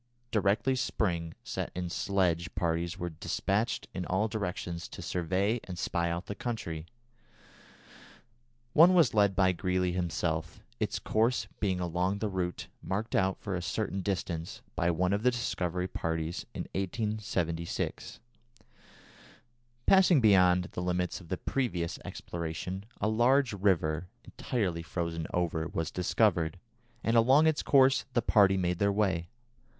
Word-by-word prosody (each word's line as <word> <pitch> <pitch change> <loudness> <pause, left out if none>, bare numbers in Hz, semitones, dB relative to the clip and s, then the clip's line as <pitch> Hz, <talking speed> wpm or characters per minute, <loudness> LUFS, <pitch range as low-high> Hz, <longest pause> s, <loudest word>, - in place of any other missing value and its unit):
Directly 110 +5 +2
spring 85 -9 -1
set - - -4
in 90 0 -2
sledge 85 -2 0
parties 85 0 -1
were 85 0 -4
despatched 100 +7 -1
in 90 - -3
all 95 +4 +1
directions 90 -5 -4
to - - -11
survey 95 +6 0
and 90 -2 -7
spy 85 0 -1
out 85 +2 -3
the - - -4
country. 85 -8 -4 1.9
One 175 +4 +7
was 170 -3 +5
led 100 -2 +3
by 95 -1 +4
Greely 90 0 0
himself, 85 -2 -2 0.2
its - - -1
course 115 +3 +1
being 95 -3 0
along 90 +3 0
the 105 0 -2
route 90 -2 -3 0.2
marked 105 +4 -3
out, 95 0 +2
for 100 - -4
a 90 - -2
certain 95 +3 -2
distance, 90 -4 -3
by 85 - +1
one 90 +3 +1
of 100 - 0
the 125 - +4
Discovery 90 -7 -2
parties 80 -1 -3
in - - -3
1876. 95 -4 -2 1.7
Passing 190 -5 +6
beyond 90 -5 +5
the - - -4
limits 90 +1 -1
of 85 - -14
the 95 - -1
previous 90 -11 -2
exploration, 85 +3 -5
a 105 - +1
large 120 +3 +3
river, 90 -4 +1 0.2
entirely 95 -9 -2
frozen 85 0 -3
over, 85 -2 -1
was 80 -1 -3
discovered, 90 -3 +1 0.5
and 115 - +1
along 130 +7 +6
its 160 -2 +2
course 135 -1 +4
the 120 -2 +2
party 100 -4 +5
made 90 -1 0
their 100 0 +3
way. 95 -5 0
95 Hz, 140 wpm, -30 LUFS, 85-110 Hz, 1.9 s, One